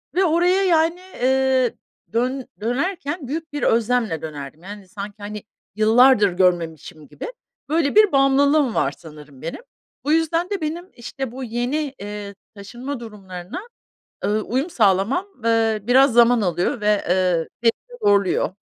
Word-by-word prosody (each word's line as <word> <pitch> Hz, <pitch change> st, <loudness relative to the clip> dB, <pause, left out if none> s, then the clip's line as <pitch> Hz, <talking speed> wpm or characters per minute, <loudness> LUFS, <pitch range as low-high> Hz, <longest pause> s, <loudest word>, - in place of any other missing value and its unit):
ve 380 Hz, -, +3 dB
oraya, 355 Hz, +4 st, +3 dB
yani, 335 Hz, 0 st, +2 dB, 0.2 s
iii, 260 Hz, -1 st, +2 dB, 0.4 s
dön 255 Hz, +3 st, -1 dB
dönerken 285 Hz, -, -2 dB
büyük 315 Hz, +1 st, -5 dB
bir 290 Hz, -, -3 dB
özlemle 225 Hz, -7 st, +1 dB
dönerdim, 150 Hz, +1 st, -8 dB
yani, 200 Hz, -1 st, -10 dB
sanki, 200 Hz, +2 st, -7 dB
hani, 210 Hz, +1 st, -7 dB, 0.3 s
yıllardır 220 Hz, 0 st, +5 dB
görmemişim 165 Hz, -4 st, -1 dB
gibi. 485 Hz, -, -8 dB, 0.4 s
Böyle 315 Hz, +1 st, +1 dB
bir 425 Hz, -2 st, +6 dB
bağımlılığım 275 Hz, -1 st, +3 dB
var 135 Hz, -, +1 dB
sanırım 150 Hz, -5 st, -13 dB
benim. 165 Hz, -, -6 dB, 0.4 s
Bu 295 Hz, -, +1 dB
yüzden 330 Hz, +3 st, +1 dB
de 400 Hz, -3 st, -3 dB
benim, 335 Hz, +4 st, -4 dB
işte, 245 Hz, +1 st, -6 dB
bu 260 Hz, +1 st, -7 dB
yeni, 255 Hz, +5 st, -2 dB
eee, 205 Hz, 0 st, -7 dB, 0.2 s
taşınma 240 Hz, +7 st, -7 dB
durumlarına, 195 Hz, -, -8 dB, 0.6 s
eee, -, -, +1 dB
uyum 250 Hz, +9 st, -1 dB
sağlamam, 215 Hz, -, +2 dB, 0.2 s
eee, 225 Hz, -1 st, +2 dB
biraz 255 Hz, +3 st, +5 dB
zaman 240 Hz, -1 st, +5 dB
alıyor 180 Hz, +4 st, -1 dB
ve, 210 Hz, -, -1 dB, 0.2 s
eee, 180 Hz, -1 st, +2 dB
ve -, -, -7 dB, 0.2 s
beni 485 Hz, -, -1 dB
zorluyor. 200 Hz, -2 st, +2 dB
240 Hz, 140 wpm, -21 LUFS, 200-290 Hz, 0.6 s, bir